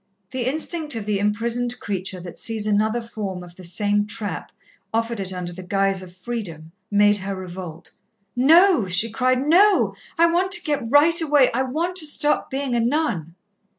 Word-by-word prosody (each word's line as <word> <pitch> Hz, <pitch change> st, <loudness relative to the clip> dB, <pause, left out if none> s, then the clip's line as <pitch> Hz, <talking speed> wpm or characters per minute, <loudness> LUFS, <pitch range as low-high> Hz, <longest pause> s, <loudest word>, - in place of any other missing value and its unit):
The 255 Hz, -2 st, -2 dB
instinct 310 Hz, 0 st, -3 dB
of 220 Hz, -3 st, -4 dB
the 205 Hz, -2 st, 0 dB
imprisoned 235 Hz, +4 st, -1 dB
creature 190 Hz, -2 st, -3 dB
that 175 Hz, -1 st, -9 dB
sees 220 Hz, -2 st, 0 dB
another 215 Hz, +3 st, +1 dB
form 205 Hz, -6 st, -6 dB
of 175 Hz, -1 st, -14 dB
the 185 Hz, -, -13 dB
same 205 Hz, +4 st, 0 dB
trap 210 Hz, -1 st, -3 dB, 0.4 s
offered 230 Hz, 0 st, -1 dB
it 190 Hz, -1 st, -3 dB
under 180 Hz, -1 st, -5 dB
the 185 Hz, -, -9 dB
guise 195 Hz, +1 st, 0 dB
of 180 Hz, -1 st, -12 dB
freedom, 180 Hz, -7 st, -6 dB, 0.2 s
made 205 Hz, 0 st, +4 dB
her 195 Hz, 0 st, -4 dB
revolt. 180 Hz, -3 st, -8 dB, 0.4 s
"No," 320 Hz, -, +5 dB
she 190 Hz, +5 st, +2 dB
cried. 255 Hz, +3 st, +1 dB
"No! 390 Hz, +6 st, +4 dB, 0.2 s
I 335 Hz, -, +6 dB
want 355 Hz, +3 st, +1 dB
to -, -, -1 dB
get 290 Hz, -7 st, -2 dB
right 330 Hz, +4 st, +5 dB
away 295 Hz, -4 st, +4 dB
I 250 Hz, -, +1 dB
want 325 Hz, +8 st, -2 dB
to 315 Hz, -4 st, +1 dB
stop 295 Hz, 0 st, +1 dB
being 270 Hz, -1 st, -3 dB
a 240 Hz, -, +2 dB
nun." 230 Hz, -, -1 dB
225 Hz, 180 wpm, -22 LUFS, 190-285 Hz, 0.4 s, I